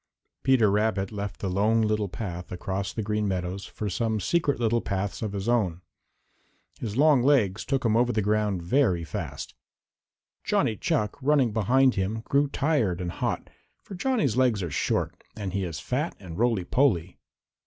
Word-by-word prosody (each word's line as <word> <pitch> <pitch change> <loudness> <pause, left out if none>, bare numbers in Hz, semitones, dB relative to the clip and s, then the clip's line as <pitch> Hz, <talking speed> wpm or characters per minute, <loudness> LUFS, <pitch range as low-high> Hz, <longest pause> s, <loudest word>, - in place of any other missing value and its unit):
Peter 125 -6 +4
Rabbit 105 -2 0
left 100 -2 -5
the 100 - -1
Lone 105 +5 +2
Little 105 -2 0
Path 90 -1 -6
across 95 +2 -3
the 110 - -4
Green 105 0 -1
Meadows 95 0 -3
for 105 - -5
some 110 +4 -1
secret 145 - +1
little 120 0 +2
paths 95 0 -3
of 105 -3 -3
his 100 +1 -4
own. 100 -8 +1 1.0
His 110 -1 -4
long 145 -2 +5
legs 120 -8 +3
took 135 -3 -1
him 110 -1 +3
over 120 +1 +3
the 110 -3 0
ground 105 -3 0
very 95 -4 +2
fast. 80 - -6 0.9
Johnny 110 - +1
Chuck, 120 - -1
running 135 -5 +3
behind 125 +5 +3
him, 100 +3 -2
grew 140 +5 +2
tired 135 - 0
and 90 -1 -3
hot, - - -2 0.4
for - - -10
Johnny's 185 - 0
legs 125 -6 +2
are 85 - -4
short - - -1
and 100 -4 -5
he 100 -1 -1
is 85 -3 -4
fat 145 +7 -2
and 90 -4 -9
roly 115 -4 +1
poly. 95 - +1
105 Hz, 170 wpm, -26 LUFS, 95-125 Hz, 1.0 s, long